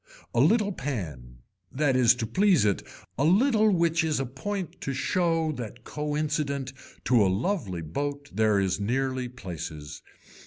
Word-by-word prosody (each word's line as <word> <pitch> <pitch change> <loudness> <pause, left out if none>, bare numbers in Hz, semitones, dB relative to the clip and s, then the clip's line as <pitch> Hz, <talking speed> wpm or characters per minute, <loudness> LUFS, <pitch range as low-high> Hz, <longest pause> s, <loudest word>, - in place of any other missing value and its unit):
A 115 - +1
little 205 - +4
pan, 75 - -6 0.3
that 140 -1 +1
is 125 -2 +5
to 115 - -3
please 185 - +3
it, 100 -2 +1 0.4
a - - +3
little 215 - +4
which 170 -2 +2
is 155 -3 0
a 135 - -1
point 180 +9 -5
to 135 - -3
show 165 +2 +1
that 120 -3 -7
co 150 +2 -3
incident 140 -3 -2 0.3
to 120 -4 +4
a - - +3
lively 100 - -1
boat 145 - -4
there 110 -2 +3
is 95 -1 0
nearly 130 +3 -1
places. 80 -10 -7
135 Hz, 155 wpm, -27 LUFS, 105-160 Hz, 0.4 s, is